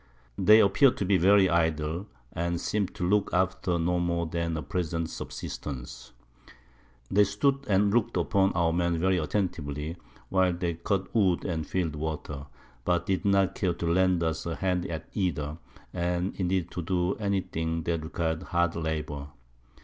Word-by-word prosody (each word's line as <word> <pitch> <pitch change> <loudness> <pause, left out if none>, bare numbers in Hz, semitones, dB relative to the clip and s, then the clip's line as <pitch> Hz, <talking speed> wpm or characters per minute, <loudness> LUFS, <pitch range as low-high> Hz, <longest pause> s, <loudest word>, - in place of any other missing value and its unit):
They 105 +3 +7
appear'd 120 +7 +4
to 100 - -1
be 95 0 +4
very 95 +2 +6
idle, 80 +1 0 0.3
and 85 0 -1
seem 105 +1 0
to 90 - -4
look 105 +2 +2
after 95 -1 +1
no 90 +1 +1
more 85 -1 0
than 85 0 -2
a 75 - -4
present 80 +1 -2
Subsistance. 65 -2 -7 1.0
They 105 +2 +6
stood 135 +8 +1
and 100 +1 +3
look'd 120 0 +1
upon 95 -2 +2
our 85 -1 +2
Men 85 0 +1
very 95 +2 +2
attentively, 80 -3 -2 0.3
while 95 -1 +3
they 85 -1 -2
cut 95 +4 -2
Wood 95 -6 +2
and 80 -4 -2
fill'd 85 -5 -1
Water; 75 -2 -5 0.4
but 85 +1 +1
did 95 +2 -1
not 100 -2 +3
care 90 -3 0
to 85 - -4
lend 90 0 +3
us 80 0 -2
a 85 - -2
Hand 90 -2 -1
at 80 -3 -5
either, 80 -6 -2 0.3
or 90 - -4
indeed 90 0 -1
to 90 - -4
do 90 +2 0
any 100 -3 0
thing 80 -1 -3
that 85 -1 -1
requir'd 80 +1 -2
hard 85 -2 0
Labour. 75 -3 -3
85 Hz, 165 wpm, -28 LUFS, 80-95 Hz, 1.0 s, They